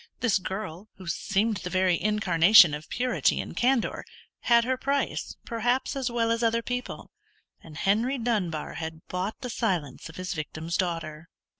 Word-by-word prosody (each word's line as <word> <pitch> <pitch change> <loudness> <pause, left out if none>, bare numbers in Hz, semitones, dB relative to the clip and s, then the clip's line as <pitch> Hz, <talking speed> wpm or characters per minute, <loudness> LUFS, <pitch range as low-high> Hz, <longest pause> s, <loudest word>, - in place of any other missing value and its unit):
This 230 -6 +2
girl, 190 0 -6
who 190 - -12
seemed 205 +5 0
the 180 - -5
very 185 -2 +2
incarnation 195 -3 +6
of 150 +1 -6
purity 250 +1 +1
and - - -5
candour, 250 -1 +1 0.4
had 235 -1 +4
her 260 +2 0
price, 275 +2 -2
perhaps, 245 +4 0
as 265 -2 -1
well 230 -1 0
as 230 0 0
other 230 0 +1
people, 250 +1 -5 0.5
and 155 -2 -12
Henry 225 +9 +1
Dunbar 205 -10 -2
had 160 0 -7
bought 185 +4 -3
the 250 - -5
silence 170 - -2
of 160 - -12
his 185 +1 -4
victim's 160 +1 -4
daughter. 165 -3 -3
205 Hz, 160 wpm, -27 LUFS, 170-235 Hz, 0.5 s, incarnation